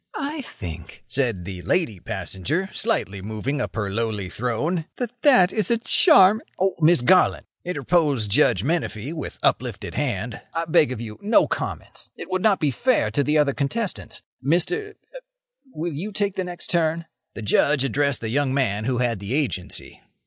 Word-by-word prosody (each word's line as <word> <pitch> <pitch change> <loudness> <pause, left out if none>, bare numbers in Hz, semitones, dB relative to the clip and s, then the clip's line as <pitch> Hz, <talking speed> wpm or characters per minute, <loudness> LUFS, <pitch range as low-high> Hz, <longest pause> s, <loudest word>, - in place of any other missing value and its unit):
"I 295 +1 -3
think," 85 - -9
said 115 -8 -1
the 95 -1 -6
lady 110 - 0
passenger, 115 - -3
slightly 100 - -1
moving 110 +8 -3
upon 110 - -3
her 100 - -3
lowly 105 -3 -2
throne, 150 - -2
"that 245 -1 -5
that 250 -11 +5
is 215 -4 +1
a 235 - +3
char—" 220 - +6 0.2
"Oh, 190 +1 +1
Miss 160 -4 +5
Garland!" 185 +8 +4 0.2
interposed 145 - 0
Judge 95 -2 +3
Menefee, 145 -4 -2
with 155 -4 -6
uplifted - - -1
hand, 120 -5 -3
"I 165 0 -1
beg 150 -4 +3
of 120 -3 -5
you, 110 -2 -8
no 210 +3 +4
comments! - - -5
It - - -9
would 185 0 0
not 205 -2 +3
be 150 -3 +1
fair 250 - +1
to 145 - +1
the 150 +2 +2
other 145 -2 +3
contestants. 185 +11 -3 0.2
Mr.—er—will 420 - -4
you 185 +9 -4
take 200 -1 -1
the 190 -2 -2
next 175 -1 -2
turn?" 165 -1 +1 0.3
The 115 - -6
Judge 140 +6 +2
addressed 140 -1 0
the 110 - -3
young 135 +2 0
man 110 -6 0
who 125 0 0
had 120 -4 0
the 100 +6 -3
Agency. 130 -12 -3
145 Hz, 170 wpm, -23 LUFS, 115-185 Hz, 0.3 s, char